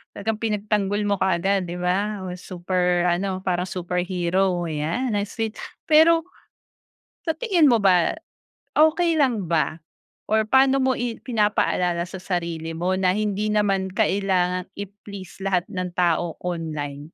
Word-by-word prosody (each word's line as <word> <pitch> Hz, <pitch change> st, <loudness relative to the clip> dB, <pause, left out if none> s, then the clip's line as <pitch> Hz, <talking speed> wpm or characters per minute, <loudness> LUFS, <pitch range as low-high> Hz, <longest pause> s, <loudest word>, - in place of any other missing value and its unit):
talagang 215 Hz, +1 st, -2 dB
pinagtanggol 210 Hz, -1 st, 0 dB
mo 200 Hz, -1 st, 0 dB
kaagad, 190 Hz, 0 st, +1 dB
'di 175 Hz, -, -4 dB
ba? 190 Hz, +3 st, -1 dB
Super 180 Hz, -1 st, 0 dB
ano, 185 Hz, +2 st, 0 dB
parang 180 Hz, 0 st, -1 dB
superhero, 180 Hz, 0 st, -1 dB
ayan. 165 Hz, -, -2 dB
Ang 205 Hz, 0 st, 0 dB
sweet. 225 Hz, -1 st, -4 dB, 0.3 s
Pero, 325 Hz, +1 st, +5 dB, 1.0 s
sa 325 Hz, -, +1 dB
tingin 350 Hz, -, +4 dB
mo 235 Hz, -, +4 dB
ba, 185 Hz, -4 st, +4 dB, 0.6 s
okey 325 Hz, +2 st, +4 dB
lang 240 Hz, -, +1 dB
ba 160 Hz, 0 st, 0 dB, 0.5 s
or 220 Hz, 0 st, +3 dB
pa'no 265 Hz, +4 st, +4 dB
mo 260 Hz, -1 st, +2 dB
i 240 Hz, -2 st, -3 dB
pinapaalala 205 Hz, -6 st, +1 dB
sa 185 Hz, +1 st, -9 dB
sarili 170 Hz, -3 st, -3 dB
mo 180 Hz, +2 st, 0 dB
na 185 Hz, +1 st, +2 dB
hindi 210 Hz, 0 st, -1 dB
naman 200 Hz, -3 st, +1 dB
kailangang 185 Hz, -3 st, 0 dB
i-please 200 Hz, -2 st, -9 dB
lahat 190 Hz, -2 st, 0 dB
ng 185 Hz, -2 st, -2 dB
tao 175 Hz, -1 st, +1 dB
online? 150 Hz, -4 st, -4 dB
190 Hz, 135 wpm, -23 LUFS, 180-215 Hz, 1.0 s, Pero